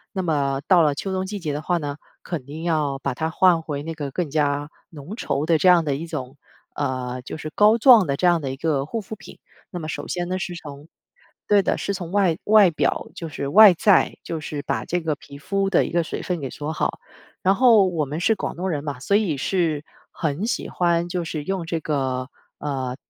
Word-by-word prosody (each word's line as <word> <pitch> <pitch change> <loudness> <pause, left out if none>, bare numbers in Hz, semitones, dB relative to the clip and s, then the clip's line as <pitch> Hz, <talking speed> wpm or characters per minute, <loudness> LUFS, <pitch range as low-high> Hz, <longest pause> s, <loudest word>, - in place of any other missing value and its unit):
那 190 - 0
么 140 -5 0
到 180 -3 +6
了 150 -2 +3
秋 190 +7 -4
冬 190 0 -1
季 205 +1 -5
节 155 -5 -3
的 150 - -3
话 175 +2 +1
呢， 145 -2 -4 0.3
肯 165 -7 -5
定 150 +4 -8
要 150 -5 0
把 140 -2 -3
它 160 +4 -2
换 175 -3 +3
回 145 -3 -4
那 165 +2 -6
个 145 -4 -5
更 170 -2 -2
加 145 -1 0 0.2
浓 155 +6 -8
稠 150 -10 -2
的 165 - +4
这 185 - +2
样 175 -2 +6
的 145 -3 -1
一 160 +4 -5
种， 145 -4 -6 0.4
呃， 130 -3 -3
就 - - -7
是 155 0 -6
膏 215 +2 +5
状 230 -6 +7
的 140 - -1
这 180 - +1
样 175 -1 +4
的 135 -4 -4
一 135 - -5
个 140 -2 -1
护 225 +8 -4
肤 215 +2 -8
品。 - - -14 0.3
那 175 - -5
么 155 - -6
首 - - -5
先 175 0 -3
呢， 185 - -1
是 180 -1 -4
从 145 -2 -10 0.6
对 205 -1 +4
的， - - 0
是 200 - -2
从 175 -2 -6
外 190 -5 +2
外 210 -3 +6
表 155 - -1
就 165 - -6
是 140 -2 -5
外 200 +4 +8
在， 185 +3 +3
就 165 - -4
是 150 -1 -5
把 - - -3
这 175 +1 -1
个 160 -2 -1
皮 140 0 -13
肤 195 +5 -1
的 180 - +4
一 - - -5
个 170 -1 +1
水 - - -5
分 180 -2 -3
给 135 -3 -5
锁 150 +1 -5
好。 - - -2 0.4
然 190 +1 +3
后 225 -5 +6
我 160 -5 -1
们 150 +4 -5
是 220 +5 +2
广 - - -4
东 185 +3 -3
人 145 -5 -2
嘛， 145 -4 -5
所 200 +9 +2
以 185 -9 0
是 160 -2 0 0.3
很 160 +4 -2
喜 235 - -2
欢 170 -1 +1
就 175 -1 -2
是 155 -2 -4
用 190 -1 -3
这 165 -1 -2
个， 135 -3 -2 0.3
呃， 130 -3 -3
160 Hz, 255 characters per minute, -23 LUFS, 145-185 Hz, 0.6 s, 外